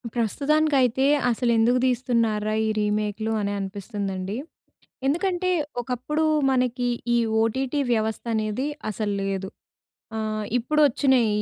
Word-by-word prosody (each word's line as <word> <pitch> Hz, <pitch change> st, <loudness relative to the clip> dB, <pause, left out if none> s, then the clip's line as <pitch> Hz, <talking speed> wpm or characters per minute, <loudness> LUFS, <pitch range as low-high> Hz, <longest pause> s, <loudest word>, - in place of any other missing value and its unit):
ప్రస్తుతానికైతే 270 Hz, +1 st, +2 dB, 0.2 s
అసలు 240 Hz, 0 st, +1 dB
ఎందుకు 240 Hz, +3 st, +3 dB
తీస్తున్నార్రా? 230 Hz, -4 st, +1 dB
ఈ -, -, +1 dB
రీమేక్‌లు 210 Hz, +1 st, -1 dB
అని 200 Hz, 0 st, -1 dB
అనిపిస్తుందండి. 195 Hz, -1 st, -4 dB, 0.7 s
ఎందుకంటే 355 Hz, +5 st, +1 dB, 0.3 s
ఒకప్పుడు 255 Hz, +6 st, -2 dB, 0.3 s
మనకి 250 Hz, -1 st, +1 dB, 0.3 s
ఈ -, -, +4 dB, 0.3 s
ఓటీటీ 260 Hz, +5 st, 0 dB
వ్యవస్థ 220 Hz, -1 st, -1 dB
అనేది 215 Hz, +4 st, -1 dB, 0.2 s
అసలు 210 Hz, -1 st, -2 dB
లేదు. 195 Hz, -1 st, -2 dB, 0.7 s
ఆహ్, 215 Hz, -1 st, -2 dB
ఇప్పుడు 300 Hz, +6 st, +1 dB
వచ్చినయి 265 Hz, -2 st, +3 dB
230 Hz, 105 wpm, -24 LUFS, 215-265 Hz, 0.7 s, ఈ